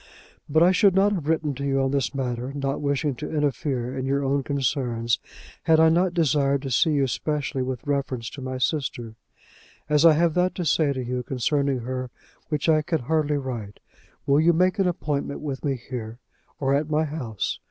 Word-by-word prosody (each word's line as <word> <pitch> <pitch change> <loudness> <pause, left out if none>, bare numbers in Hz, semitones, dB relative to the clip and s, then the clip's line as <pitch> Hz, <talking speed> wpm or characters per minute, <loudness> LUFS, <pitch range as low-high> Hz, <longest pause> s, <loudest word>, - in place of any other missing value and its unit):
But 160 +3 +4
I 180 - +6
should 195 0 +4
not 200 +2 +4
have 165 -7 -3
written 160 -2 +1
to 140 +1 -6
you 135 -1 +1
on 135 0 +1
this 140 -2 -1
matter, 125 -1 -3
not 140 0 -2
wishing 145 0 0
to - - -5
interfere 135 -4 -1
in 130 0 -3
your 140 +1 +1
own 140 +1 +1
concerns, 125 -4 -1 0.5
had 160 -1 +5
I 160 0 +6
not 175 +2 +2
desired 140 -4 +2
to 135 - -4
see 125 +7 +3
you 140 -2 +2
specially 135 +3 -2
with 130 +1 -4
reference 140 -5 -2
to 140 - -9
my 130 0 -4
sister. 125 -4 -2 0.7
As 150 0 +3
I 165 -2 +8
have 165 +1 +2
that 180 +2 +1
to 180 - -3
say 150 -1 +2
to 130 -2 -3
you 125 +1 -2
concerning 135 +1 0
her 130 +1 -4 0.4
which 150 -1 -1
I 155 -1 +4
can 160 0 -1
hardly 150 +2 0
write, 120 -7 -5 0.5
will 140 +1 +4
you 170 +2 +4
make 185 +4 +2
an 195 - +3
appointment 145 -5 -2
with 140 -3 -5
me 140 -2 0
here, 120 -2 -7 0.4
or 135 -1 +1
at 145 +2 0
my 155 +1 +2
house? 135 -10 -3
140 Hz, 200 wpm, -24 LUFS, 130-155 Hz, 0.7 s, I